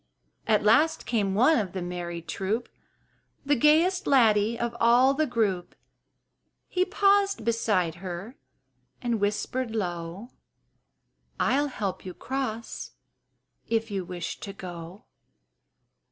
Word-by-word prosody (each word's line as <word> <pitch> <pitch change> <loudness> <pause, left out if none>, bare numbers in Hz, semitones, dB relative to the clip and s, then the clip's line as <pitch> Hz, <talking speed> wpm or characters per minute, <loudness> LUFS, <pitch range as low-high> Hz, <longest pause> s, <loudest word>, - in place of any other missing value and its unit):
At 215 -2 +3
last 295 +10 +3
came 200 -5 0
one 250 +7 +5
of 195 -5 -3
the 190 - -3
merry 175 -1 -5
troop, 205 +7 -3 0.8
The 290 +1 +3
gayest 325 +8 +3
laddie 225 -4 +4
of 235 0 -2
all 245 +3 +5
the 305 +2 0
group: 210 -7 -1 0.9
He 365 0 +1
paused 400 - +2
beside 210 -7 +1
her 190 +6 -6 0.6
and 235 -3 -1
whispered 225 +4 -1
low, 175 +2 -4 1.1
"I'll 290 +2 +2
help 205 -8 -4
you 185 -1 -8
cross, 255 -4 -4 0.7
if 225 -1 -1
you 195 -2 -2
wish 175 -1 -6
to 200 - -7
go." 180 +2 -9
225 Hz, 115 wpm, -27 LUFS, 190-260 Hz, 1.1 s, one